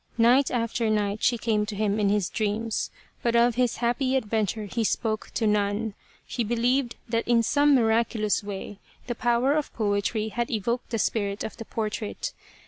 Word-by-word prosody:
Night 245 +4 +5
after 230 -1 0
night 210 -1 0
she 240 - +3
came 220 -2 +1
to 210 - -4
him 210 0 0
in 205 -1 +2
his 205 -3 +1
dreams, 220 +1 -1 0.3
but 235 -1 +1
of 235 +1 +5
his 245 0 +1
happy 255 +2 +1
adventure 220 -3 -1
he 225 +3 -2
spoke 220 0 -1
to 225 - +1
none. 210 +1 +1 0.3
He 240 - -2
believed 240 +3 +1
that 230 0 -1
in 235 -1 +4
some 290 +4 +4
miraculous 225 -3 +2
way 200 0 -6 0.3
the 240 - -2
power 240 +3 +2
of 300 -1 -1
poetry 210 +1 0
had 235 +2 -2
evoked 235 +2 -2
the 230 - -1
spirit 200 -1 -1
of - - -5
the 225 - -7
portrait. 215 -1 -3
225 Hz, 175 wpm, -26 LUFS, 210-240 Hz, 0.3 s, Night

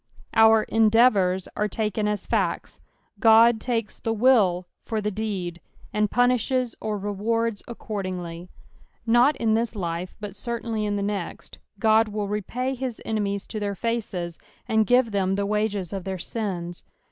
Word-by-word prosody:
Our 220 0 +6
" - - -24
endeatovri" 215 -5 +4
are 210 - 0
taken 210 0 -1
ax 210 -2 -2
facts; - - -1 0.4
Ood 225 0 +6
takes 230 -3 -2
the 225 - -1
will 210 -7 +3 0.2
for 220 - -2
the 210 0 -2
deed, 190 -5 -4 0.3
and 210 0 +1
punishes 245 +1 +1
or 215 -1 -2
rewards 210 +2 -1
accordingly. 185 -6 -5 0.6
Nut 240 +5 +4
in 225 -2 +1
this 225 0 0
life, 175 -2 -4
but 205 -2 -7
certainly 230 -1 -3
in 205 - -1
the 200 - -1
next, 200 -3 -5 0.3
Ood 220 0 +5
will 210 -1 -3
repay 235 +6 -2
his 255 -3 -4
enemies 200 -2 -2
to 215 - -4
their 200 -1 -2
faces, 195 -6 -3 0.3
aod 220 -1 +2
give 245 -2 +4
them 195 -1 +1
the 200 0 -1
wages 205 -3 -1
of 195 -2 -4
their 190 0 -4
sins. 175 -3 -4
210 Hz, 155 wpm, -25 LUFS, 195-230 Hz, 0.6 s, Our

